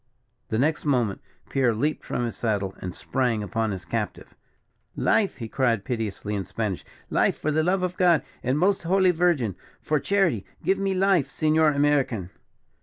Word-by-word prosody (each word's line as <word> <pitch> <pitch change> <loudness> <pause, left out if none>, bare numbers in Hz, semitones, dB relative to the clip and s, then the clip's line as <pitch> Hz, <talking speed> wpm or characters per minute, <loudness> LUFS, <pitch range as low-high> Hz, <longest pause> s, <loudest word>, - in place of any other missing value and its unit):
The 110 - 0
next 150 +6 +1
moment 120 -9 +1 0.3
Pierre 125 -4 +2
leaped 150 +7 -1
from 120 - -2
his 115 - -4
saddle 100 -4 -1
and 90 -1 -6
sprang 125 -5 -1
upon 110 +3 -1
his 95 -4 -5
captive. - - -4 0.6
"Life!" 205 -3 +2
he 115 - -6
cried, 115 -4 0
piteously, 110 -4 -3
in 100 -2 -1
Spanish, 105 -2 -3 0.3
"life, - - +2
for 155 - -1
the 155 +1 +2
love 180 +3 +1
of 180 0 -2
God, 175 -4 +4 0.2
and 130 +2 0
the - - 0
most 195 +1 +3
holy 185 +2 +3
Virgin! 160 - +1 0.2
For 155 -1 0
charity, 175 - +1 0.2
give 190 0 +2
me 195 -1 0
my - - -1
life, 175 -9 +3
Senor 155 +2 +2
American!" 140 -10 +1
135 Hz, 180 wpm, -25 LUFS, 110-170 Hz, 0.6 s, God